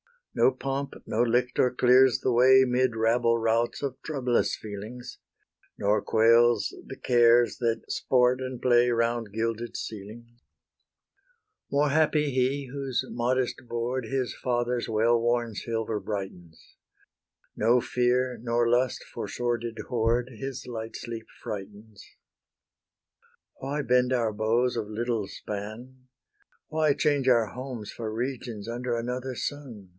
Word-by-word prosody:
No - - +4
pomp, 135 +2 -4
no 110 - 0
lictor 125 +1 +2
clears 125 0 +4
the 130 - +1
way 130 +2 +6
'Mid 125 -1 +1
rabble 115 +1 +2
routs 115 +3 0
of 135 -2 -3
troublous 130 -6 0
feelings, 110 +5 -8 0.6
Nor 105 +1 +1
quells 115 -1 +4
the - - -7
cares 120 -1 +4
that 115 -2 0
sport 125 0 +2
and 130 -1 -5
play 120 -1 +4
Round 115 -2 0
gilded 115 +1 -3
ceilings. 115 +3 -8 1.3
More 145 +1 +2
happy 150 0 +2
he 130 +2 0
whose 135 -2 -2
modest 125 +1 -1
board 120 +2 -2
His 130 +2 -2
father's 120 -1 -1
well 115 +1 +2
worn 120 -1 0
silver 115 0 -3
brightens; 95 -5 -7 0.8
No 120 +3 +3
fear, 125 0 0
nor 120 0 +1
lust 125 +1 +1
for - - -7
sordid 120 -1 -3
hoard, 120 +1 +1
His 135 +3 -6
light 115 -2 -6
sleep 115 -1 -7 0.2
frightens. 105 +1 -8 1.5
Why 140 +3 -3
bend 125 -1 +2
our 115 -3 +1
bows 115 +4 +1
of 110 -2 -2
little 110 -1 -2
span? 115 +7 -8 0.6
Why 155 -2 +2
change 140 -2 +1
our 120 -3 +4
homes 120 -1 -7
for 110 -2 -5
regions 120 -2 -4
under 120 +1 -2
Another 125 +2 -4
sun? 120 -9 -6
120 Hz, 125 wpm, -27 LUFS, 115-130 Hz, 1.5 s, way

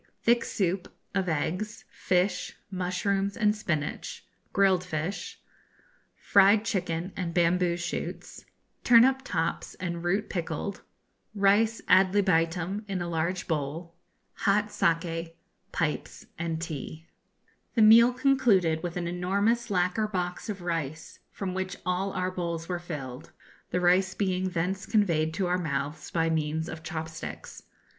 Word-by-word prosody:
Thick 235 0 +4
Soup, 190 -3 -1 0.2
of 190 -2 0
Eggs, 180 +8 -2
Fish, 180 +1 0
Mushrooms, 195 +2 -1
and 210 -2 +3
Spinach; 155 -8 -3 0.3
Grilled 190 -2 +3
Fish. 180 +2 -4 0.8
Fried 200 +2 +5
Chicken, 180 -4 -2
and 170 -3 -3
Bamboo 175 0 +2
Shoots. 170 - -5 0.4
Turnip 250 +3 +6
Tops 165 -8 -2
and 170 -2 -4
Root 195 +4 0
Pickled. 175 +2 -4 0.5
Rice 210 +3 +3
ad 185 +1 +5
libitum 180 +1 +1
in 195 -2 -2
a 175 - -3
large 170 +2 -2
bowl. 160 +2 -3 0.4
Hot 205 +1 +2
Saki, 165 0 0 0.4
Pipes - - -2
and 165 -1 -3
Tea. 160 0 -6 0.7
The 225 - +5
meal 230 +3 +8
concluded 240 - +3
with 175 0 -4
an 175 -1 -2
enormous 200 +7 0
lacquer 185 +3 +1
box 180 0 -3
of 195 -4 -5
rice, 165 -3 -4
from 190 -2 -4
which 190 0 -3
all 185 +2 0
our 185 0 -1
bowls 170 -2 -3
were 180 -1 -2
filled, 145 -6 -7 0.4
the 180 - 0
rice 185 +2 +3
being 185 -2 0
thence 185 +2 -2
conveyed 170 -8 +2
to 190 - 0
our 180 +1 +1
mouths 150 -2 -3
by 165 -1 +1
means 160 0 -1
of 160 - -7
chop 160 -1 -4
sticks. 160 0 -8
180 Hz, 135 wpm, -28 LUFS, 165-200 Hz, 0.8 s, meal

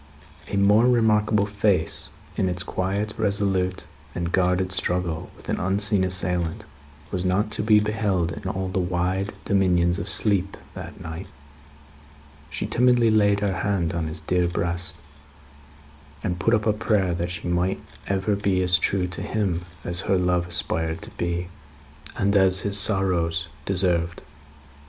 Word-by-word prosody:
A 100 - -3
more 105 +4 +5
remarkable 110 -3 +3
face 100 -5 0 0.3
in 95 - 0
its 90 0 -3
quiet, 100 +3 -2
resolute, 100 -3 0 0.3
and 85 0 -2
guarded 90 0 +1
struggle 90 -3 -1
with - - -16
an - - -1
unseen 100 +1 +2
assailant, 90 -2 -1 0.5
was 90 -2 -2
not 95 +4 0
to - - -1
be 105 0 +5
beheld 105 -5 0
in 95 - -5
all 95 0 -3
the 95 +1 -2
wide 90 +3 -1
dominions 90 -3 +2
of 95 - -4
sleep, 100 -3 +1 0.2
that - - -9
night. 80 +4 -7 1.2
She 75 +4 -4
timidly 120 +1 +3
laid 100 -1 +3
her 100 -2 0
hand 90 -5 -1
on 85 -2 -2
his 80 0 -5
dear 90 +2 +1
breast, 85 0 -3 1.3
and 90 -4 -2
put 115 +6 +3
up 105 - -1
a 110 - +3
prayer 105 -4 +1
that 85 +1 -2
she 90 +2 -5
might 90 +2 0 0.3
ever 100 +1 0
be 100 -2 0
as 90 0 +4
true 95 0 +1
to 90 +1 -5
him 95 -4 -2 0.2
as 85 0 +3
her 95 0 +1
love 90 -1 +1
aspired 80 -2 -2
to - - -6
be, 85 0 -3 0.7
and 100 +1 +1
as 95 -1 +4
his 100 -1 0
sorrows 90 -5 +4 0.2
deserved. 90 -3 0
95 Hz, 150 wpm, -24 LUFS, 90-100 Hz, 1.3 s, more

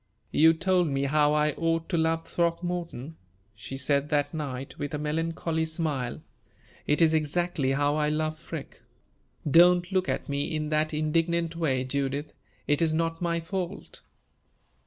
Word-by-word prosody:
"You 160 +2 +6
told 180 +1 +2
me 135 -1 -1
how 150 +1 +3
I 150 0 +3
ought 165 +1 -1
to 180 - 0
love 165 0 +1
Throckmorton," 170 -4 -2 0.4
she 110 +5 -7
said 140 +2 0
that 145 0 +1
night, 135 -4 -5
with 145 +1 -3
a - - -1
melancholy 160 +2 -1
smile; 155 -7 -2 0.6
"it 150 +3 +3
is 160 -1 +4
exactly 155 -2 0
how 145 +2 +1
I 150 -1 +1
love 155 0 -1
Freke. 165 -2 -8 0.7
Don't 175 +4 +5
look 185 -1 +1
at - - -2
me 140 +2 -2
in 155 -1 -2
that 155 0 +1
indignant 165 +2 0
way, 135 -6 0
Judith. 140 +2 -2 0.3
It 145 +1 +1
is 160 -1 +2
not 165 +1 -1
my 170 -1 0
fault." 180 +2 -5
155 Hz, 155 wpm, -27 LUFS, 145-165 Hz, 0.7 s, You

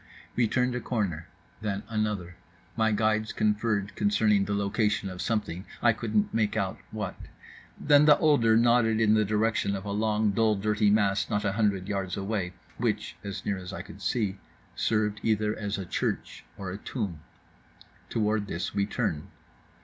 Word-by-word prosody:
We 120 -2 +3
turned 125 +2 +1
a 125 - -1
corner, 100 -11 -2 0.3
then 105 -2 -2
another. 105 -6 -2 0.4
My 110 -1 +2
guides 110 0 +1
conferred 105 -1 0
concerning 105 - +3
the 100 - -1
location 100 0 0
of 90 - -6
something, 105 -6 -2 0.2
I 115 -1 +4
couldn't 110 -2 0
make 110 -2 +1
out 95 -1 -1
what. 105 -4 -4 0.7
Then 145 0 +5
the 150 -1 +7
older 120 -8 +4
nodded 115 -1 +4
in 110 -1 +4
the 110 0 +4
direction 105 -1 +1
of 95 0 -6
a 100 - -3
long 105 0 +1
dull 110 +1 +2
dirty 105 +1 +2
mass 100 -1 +2
not 105 0 0
a 100 - +2
hundred 100 -3 0
yards 95 -3 -2
away, 95 -2 -2 0.3
which - - -1
(as 100 -1 -6
near 100 -2 -1
as 90 0 -7
I 95 - -6
could - - -12
see) 105 -5 0 0.4
served 105 -1 0
either 110 -1 +1
as 105 -1 -3
a 95 - -4
church - - -3
or 95 -2 -5
a 100 - -6
tomb. 100 - -4 0.9
Toward 105 -2 0
this 85 - -3
we 100 0 +1
turned. 75 -2 -2
105 Hz, 170 wpm, -28 LUFS, 100-110 Hz, 0.9 s, the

